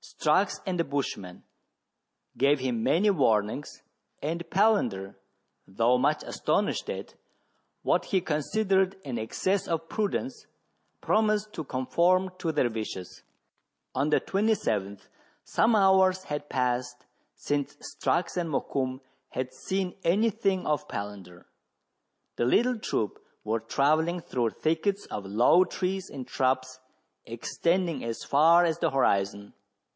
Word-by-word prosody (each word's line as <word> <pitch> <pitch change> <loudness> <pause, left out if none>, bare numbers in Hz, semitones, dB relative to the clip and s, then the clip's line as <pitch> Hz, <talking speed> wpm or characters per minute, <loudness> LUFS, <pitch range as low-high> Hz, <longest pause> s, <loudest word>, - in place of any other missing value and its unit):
Strux - - +1
and 185 -3 -2
the - - +3
bushman 130 - -4 0.9
gave 140 +1 +3
him 125 -3 -1
many 195 - +3
warnings, 115 - 0 0.4
and 165 +3 -4
Palander, 125 - +1 0.5
though 115 +6 +2
much - - +1
astonished - - -1
at - - -5 0.7
what - - +2
he 190 - +1
considered 190 +4 +1
an 125 -4 -3
excess 185 - -1
of 165 -1 -2
prudence, 225 +4 -2 0.5
promised 215 -1 +1
to 160 - -4
conform 175 +8 +1
to 165 - -1
their 145 -5 +1
wishes. 110 -5 -6 0.7
On 140 +3 0
the - - +4
27th, 110 - -1 0.4
some 225 0 +2
hours 190 -2 +4
had 145 -2 -5
passed 125 -1 -1 0.3
since 145 -1 -2
Strux 175 +4 -2
and 170 -2 -1
Mokoum 130 -2 -2 0.3
had 130 0 -4
seen 190 +6 -3
any 210 +7 +3
thing 190 -2 0
of 150 -2 -1
Palander. 100 -4 -7 0.9
The 120 - +1
little 240 - +2
troop 110 - -2 0.2
were 110 +2 0
travelling 155 +9 +1
through 120 -7 -1
thickets 180 +6 -1
of 100 - -4
low 120 - +5
trees 190 0 -3
and 130 -3 -7
shrubs, 130 0 0 0.4
extending 170 -4 -1
as 115 -1 -4
far 165 +5 +5
as 165 0 0
the 165 - +2
horizon. 100 -7 0
150 Hz, 125 wpm, -28 LUFS, 125-185 Hz, 0.9 s, low